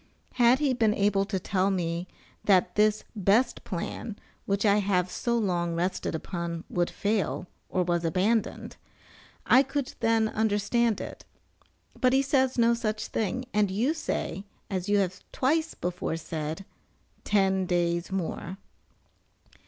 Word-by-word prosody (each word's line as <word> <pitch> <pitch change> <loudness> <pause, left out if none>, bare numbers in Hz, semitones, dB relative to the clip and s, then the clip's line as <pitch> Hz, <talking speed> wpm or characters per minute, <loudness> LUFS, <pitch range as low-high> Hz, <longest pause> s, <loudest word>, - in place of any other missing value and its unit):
Had 245 0 +5
he 280 -2 +1
been 220 -3 +2
able 200 -1 +2
to 195 -1 -2
tell 190 +1 +1
me 175 -2 -2 0.4
that 185 -3 +3
this 210 0 +3
best 210 +5 +2
plan, 205 +4 -5 0.3
which 200 +2 +1
I 205 0 +5
have 185 -3 +1
so 235 -1 0
long 175 -6 0
rested 175 -1 -1
upon, 170 0 -4
would 175 -1 +1
fail, 190 - -1 0.2
or 185 - +1
was 175 -1 0
abandoned, 195 +7 0 0.7
I 260 - +7
could 275 0 -3
then 225 -1 +3
understand 220 +1 +1
it, - - -7 0.8
but 255 -1 +3
he 270 +1 +4
says 265 -2 +2
no 235 0 +4
such 215 -2 -2
thing, 225 +4 -2
and 210 -1 +3
you 230 +11 +1
say, 255 -10 -3 0.3
as 190 0 -2
you 205 - +4
have 185 -1 -1
twice 315 +5 0
before 175 -2 -3
said, 160 +2 -5 0.6
"ten 190 -2 +2
days 170 0 0
more." 190 0 -3
200 Hz, 140 wpm, -28 LUFS, 180-230 Hz, 0.8 s, I